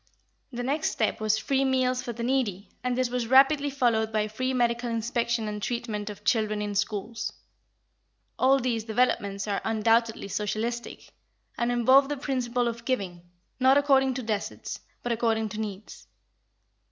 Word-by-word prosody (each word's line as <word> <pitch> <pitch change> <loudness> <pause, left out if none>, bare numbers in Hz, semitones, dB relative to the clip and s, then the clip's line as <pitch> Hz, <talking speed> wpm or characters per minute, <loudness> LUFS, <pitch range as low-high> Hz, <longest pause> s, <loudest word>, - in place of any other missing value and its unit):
The 245 -1 -4
next 290 +5 0
step - - -1
was 215 0 +2
free 270 +4 +1
meals 255 -1 +1
for 245 - -5
the 235 0 -6
needy, 235 -7 -1
and 250 0 -1
this 255 -1 0
was 245 -2 -1
rapidly 275 +3 +5
followed 235 -5 +1
by 215 -1 0
free 255 +5 -2
medical 240 -1 0
inspection 230 0 -1
and 210 0 -4
treatment 220 -3 -3
of 205 - -9
children 215 -2 +1
in 205 0 -3
schools. 210 +2 -2 1.1
All 265 +1 +5
these 240 -3 -1
developments 210 -4 0
are 200 -1 -1
undoubtedly 225 0 +1
socialistic, 220 +4 -3 0.4
and 235 0 0
involve 260 +3 +5
the 290 - -2
principle 250 -3 -1
of 235 0 -4
giving, 195 -9 -2 0.4
not 260 +2 +5
according 270 -2 +3
to 255 - -4
deserts, 215 -2 -4 0.2
but 245 - -2
according 225 -1 +1
to 215 +1 -6
needs. 210 -1 -7
235 Hz, 155 wpm, -27 LUFS, 215-255 Hz, 1.1 s, rapidly